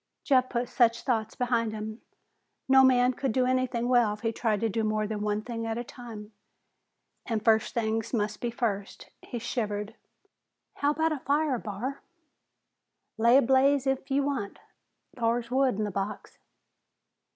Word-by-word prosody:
Jeff 255 -2 +3
put 240 0 -1
such 230 -2 +2
thoughts 225 -5 -1
behind 235 -3 0
him. 215 +1 -6 0.7
No 265 0 +7
man 250 -1 +4
could 265 +1 -2
do 255 +3 +2
anything 255 -2 0
well 240 -4 +3
if 210 - -18
he 225 - 0
tried 220 -2 0
to 225 - +2
do 220 +1 -1
more 215 0 0
than 210 0 -4
one 210 0 -1
thing 230 -1 -4
at 225 0 -2
a 240 - -3
time, 225 -4 -10 0.9
and 220 -4 -2
first 220 +2 +3
things 225 -1 -1
must 210 -3 -2
be 240 - -1
first. 215 -4 -4
He 240 - -6
shivered. 215 -3 -3 0.8
"How 285 - +1
about 320 +2 +1
a 305 - -2
fire, 285 -1 +1
Barr?" 230 +7 -5 1.2
"Lay 235 +3 +6
a 280 - +5
blaze 270 +2 +3
if'n 270 0 0
ye 280 - +3
want. 270 -8 -3 0.6
Thar's 235 0 -1
wood 260 -3 +2
in 215 - 0
the 205 - -2
box." 200 +2 -5
235 Hz, 165 wpm, -28 LUFS, 215-255 Hz, 1.2 s, No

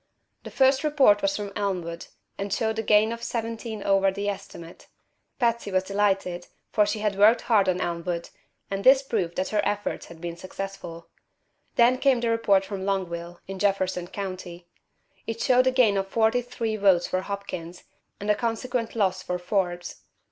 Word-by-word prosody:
The - - -9
first 265 +1 +3
report 275 -9 +4
was 195 0 +1
from 205 -1 -5
Elmwood, 180 -5 -3 0.3
and 200 0 -5
showed 220 +2 0
a - - +2
gain 215 0 +4
of 230 0 -5
seventeen 225 -2 -4
over 195 0 +3
the 200 +1 -2
estimate. 190 -4 -8 0.5
Patsy 235 -4 0
was 185 0 +2
delighted, 195 -3 0 0.2
for 210 -2 +3
she 210 +1 -2
had 205 -2 -1
worked 220 +3 +6
hard 210 -5 +3
in 180 -1 +1
Elmwood, 170 -1 -3 0.4
and 195 0 -2
this 265 +1 +6
proved 195 -10 -2
that 185 - -1
her 210 -1 +1
efforts 205 0 -2
had 170 - -12
been 170 0 -5
successful. 185 -2 -7 0.7
Then 245 +2 +4
came 260 -4 +3
a - - +1
report 200 -4 +3
from 195 -1 -5
Longville, 175 -3 -3
in 195 0 -7
Jefferson 190 -3 0
County. 185 -2 -6 0.6
It 225 0 -4
showed 255 +2 +4
a - - +4
gain 235 -6 +4
of 195 0 -1
forty 225 +4 +2
three 230 -3 -3
votes 195 -4 +4
for 185 - -1
Hopkins, 185 -3 -6 0.4
and 205 +1 0
a - - +5
consequent 235 +1 -2
loss 190 -4 +1
for 180 -1 -3
Forbes. 180 -1 -2
200 Hz, 175 wpm, -26 LUFS, 185-225 Hz, 0.7 s, worked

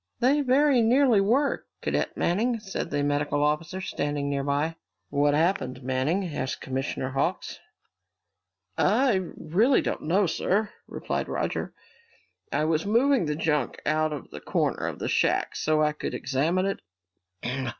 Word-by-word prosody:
"They 275 +4 +3
very 275 -1 +4
nearly 240 -2 +4
were, 260 +8 +1 0.2
Cadet - - -1
Manning," 230 +7 +1
said 195 -4 -4
the 145 -2 -1
medical 145 0 0
officer, 155 +5 -1
standing 145 -5 -2
near 140 -1 -1
by. 145 +3 0 0.4
"What 145 0 +3
happened, 150 -6 0
Manning?" 130 +9 0
asked 130 0 -3
Commissioner 130 0 -3
Hawks. 135 +1 -2 1.2
"I 225 -1 +3 0.2
really 215 - +3
don't - - -2
know, 185 +6 +2
sir," 200 +5 0 0.2
replied - - -3
Roger. - - -3 0.8
"I 150 +2 +1
was 160 0 +1
moving 235 - +3
the 150 - -1
junk 150 -4 -1
out 155 +1 +1
of 150 - -7
the - - -8
corner - - -1
of - - -4
the - - -4
shack - - +1
so 155 0 +1
I 150 - +3
could 150 - -4
examine 160 +8 0
it. 195 - -2
160 Hz, 145 wpm, -26 LUFS, 145-215 Hz, 1.2 s, very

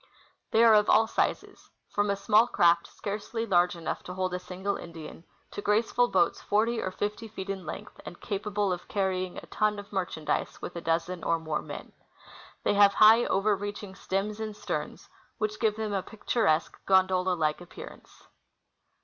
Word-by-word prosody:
They 225 - +4
are 230 -1 +7
of 210 -1 +4
all 220 +1 +6
sizes, 225 - -2 0.2
from 205 0 0
a 200 - +2
small 215 +3 +4
craft 170 -5 +3
scarcely 215 +3 -4
large 180 -4 +3
enough 170 - -4
to 180 - -7
hold 185 -1 -1
a 180 - -2
single 185 +2 -4
Indian 165 0 -9 0.3
to - - -5
graceful 225 +4 +2
boats 240 - +1
forty 225 +3 +1
or - - -2
fifty 210 +4 -4
feet 195 -2 -6
in 190 -4 -6
length - - -8
and 175 - -10
capable 205 -1 -1
of 175 - -7
carrying 185 -2 -1
a - - -8
ton 215 -1 0
of 205 0 -10
mer 190 -2 0
chandise 155 -1 -3
with - - -7
a 170 - -4
dozen 165 +2 -1
or 165 - +2
more 160 -2 -3
men. - - -9 0.7
They - - +2
have 200 -1 +5
high, 225 +3 +7
over 205 +2 +2
reaching 205 0 -6
stems 200 +3 -3
and 215 -1 -5
sterns, - - -5 0.3
which 215 0 -2
give 215 -2 +2
them 215 -1 -3
a 195 - 0
picturesque, 205 -6 -1
gondola 185 -1 +3
like 155 -1 0
appearance. 175 - -12
200 Hz, 180 wpm, -28 LUFS, 180-210 Hz, 0.7 s, are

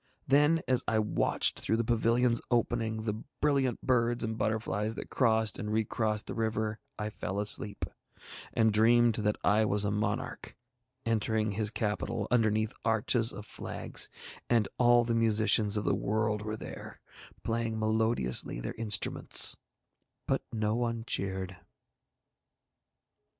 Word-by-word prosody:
Then, 150 +4 +4
as 130 -1 +2
I 110 - +2
watched 105 -1 +1
through 110 - 0
the 115 - +1
pavilion's 115 +1 +2
opening 115 -2 0
the 110 0 -3 0.2
brilliant 140 -5 +1
birds 120 -1 +2
and 110 0 -2
butterflies 110 -1 -1
that - - -7
crossed 110 -3 +2
and 105 -2 -4
recrossed 110 0 -1
over - - -5
the - - +2
river, 110 0 -2 0.2
I 105 0 -3
fell 100 -1 -4
asleep, 105 0 +1 0.7
and 110 -2 +2
dreamed 115 +2 +5
that 105 -1 +1
I 105 +2 +4
was 105 -1 +1
a 100 - 0
monarch 105 +1 -3 0.5
entering 110 -1 0
his 105 +1 -1
capital 105 -1 -2
underneath 110 -2 +2
arches 115 +1 +2
of 105 - -9
flags, - - -4 0.4
and 115 -4 +3
all 120 -1 +5
the 115 0 -1
musicians 110 -2 +3
of 105 - -2
the - - +2
world 105 0 0
were 110 +1 -4
there, - - -9 0.4
playing 115 0 -1
melodiously 110 - 0
their - - -4
instruments; 105 -3 +2 0.7
but - - +1
no 110 -1 0
one 115 -1 -1
cheered. 95 -4 -3
110 Hz, 140 wpm, -30 LUFS, 105-115 Hz, 0.7 s, dreamed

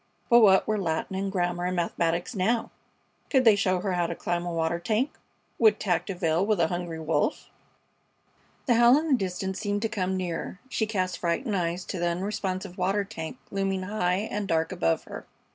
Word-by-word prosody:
But 235 - +9
what 195 -4 +5
were 215 -1 +1
Latin 170 +2 -2
and 195 +1 -2
German 175 -1 -1
and 185 - -2
mathematics 170 +2 -1
now? 225 +4 0 0.6
Could 265 -3 +3
they 220 -2 +8
show 185 -2 +1
her 195 -1 -1
how 175 -1 +1
to 170 - -4
climb 175 +1 -2
a - - -2
water 165 0 0
tank? 220 +10 0 0.5
Would 220 -2 +5
tact 175 -3 0
avail 175 -2 +1
with 210 -2 +1
a 165 -1 +3
hungry 175 -2 -4
wolf? 160 0 -1 1.1
The 250 - +3
howl 240 +3 +6
in 320 +1 -1
the - - +4
distance 190 -3 -1
seemed 205 0 -1
to 225 - 0
come 190 -3 -1
nearer. 180 +1 -4
She 220 -3 -1
cast 185 -4 -2
frightened 200 +6 -1
eyes 175 0 -1
to 185 - -4
the 175 - +1
unresponsive 185 +1 -3
water 195 +3 +1
tank 185 0 -7
looming 195 -1 -1
high 190 0 0
and 205 -1 -2
dark 165 -1 +1
above 80 0 0
her. - - -9
185 Hz, 195 wpm, -27 LUFS, 175-210 Hz, 1.1 s, But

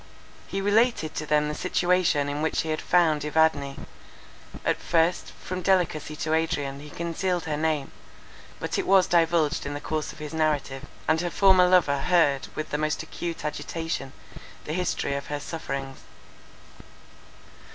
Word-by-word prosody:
He 195 - -3
related 205 -5 +2
to 155 - -4
them 150 0 +2
the 150 - -2
situation 175 -3 +1
in 145 +1 -3
which 160 - +1
he 160 - -5
had 155 - -1
found 160 -4 +3
Evadne. 150 -2 +1 0.9
At - - 0
first, 170 +1 +1
from 185 0 -6
delicacy 170 -5 +1
to 155 0 -2
Adrian 150 -4 -1
he 150 +1 -10
concealed 170 +3 -2
her 155 -2 -2
name; 155 -2 -1 0.7
but - - -2
it - - -2
was 190 -1 +6
divulged 165 -2 +2
in 145 0 -4
the - - -4
course 155 +1 -3
of - - -14
his 150 0 -7
narrative, 145 -4 -1 0.2
and 160 +1 +3
her 175 - -1
former 185 0 +5
lover 170 -6 +4
heard 145 -4 +2
with 155 - -5
the 150 - -1
most 155 0 -1
acute 170 -2 -5
agitation 150 -2 -4 0.5
the 155 - -4
history 180 -5 -1
of 140 0 -4
her 145 0 -3
sufferings. 135 -4 -5
160 Hz, 160 wpm, -26 LUFS, 150-175 Hz, 0.9 s, was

